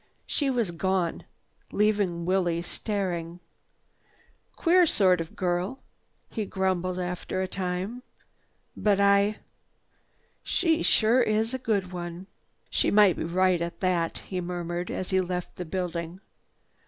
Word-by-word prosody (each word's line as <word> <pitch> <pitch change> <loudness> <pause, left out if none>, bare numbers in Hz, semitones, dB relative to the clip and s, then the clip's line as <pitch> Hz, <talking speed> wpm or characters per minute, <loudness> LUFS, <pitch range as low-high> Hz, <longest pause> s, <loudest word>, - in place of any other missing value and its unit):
She 285 -2 0
was 235 -8 0
gone, 180 0 -1 0.5
leaving 200 -5 +1
Willie 175 -2 +1
staring. 175 -4 -3 1.2
"Queer 355 0 +4
sort 185 - +3
of 165 - -8
girl!" 180 +6 -1 0.5
he 220 - -3
grumbled 185 -2 -1
after 180 +1 -3
a - - -2
time. 185 +6 -3 0.7
"But 205 -2 +2
I—she 205 - -1
sure 230 +3 +4
is 220 +1 +1
a 260 - -2
good 200 -7 -1
one! 175 0 -6 0.5
"She - - +2
might 205 -4 +6
be - - -3
right 180 +1 +2
at 170 0 -4
that," 175 -3 +1
he 185 -2 -3
murmured 175 0 -3
as 185 - -3
he 190 0 +3
left 180 -1 -4
the 180 - -4
building. 175 0 -4
185 Hz, 125 wpm, -27 LUFS, 175-205 Hz, 1.2 s, might